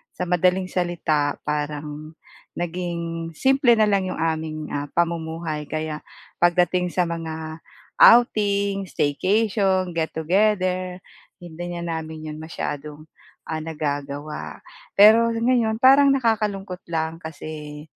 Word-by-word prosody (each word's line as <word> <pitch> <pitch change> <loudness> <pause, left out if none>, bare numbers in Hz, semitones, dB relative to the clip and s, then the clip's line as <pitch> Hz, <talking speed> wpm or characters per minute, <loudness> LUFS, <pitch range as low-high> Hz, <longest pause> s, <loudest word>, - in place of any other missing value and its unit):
sa 180 - -3
madaling 180 +1 +2
salita, 160 -5 0
parang, 150 +1 -4 0.4
naging 170 -1 -4
simple 265 - +4
na 220 - +3
lang 195 -2 +1
yung - - -4
aming 160 -1 -2
ah, 145 0 -2
pamumuhay 165 -2 -2
kaya 155 -1 -3 0.4
pagdating 180 +1 +3
sa 180 - +1
mga 160 -1 -5 0.4
outing, 200 -4 +5
staycation, 190 +4 +1
get 160 -1 -1
together, 185 +1 +1 0.5
hindi 175 +1 -7
na 170 -1 -3
namin 155 -1 -8
yun 155 - -8
masyadong, 150 -2 -6 0.5
ah, 160 - -2
nagagawa. 145 -1 -5 0.4
Pero 220 +3 +7
ngayon, 230 -1 +1
parang 275 +2 +7
nakakalungkot 210 -7 -1
lang 160 0 -2
kasi, 150 -1 -8
170 Hz, 110 wpm, -23 LUFS, 155-195 Hz, 0.5 s, Pero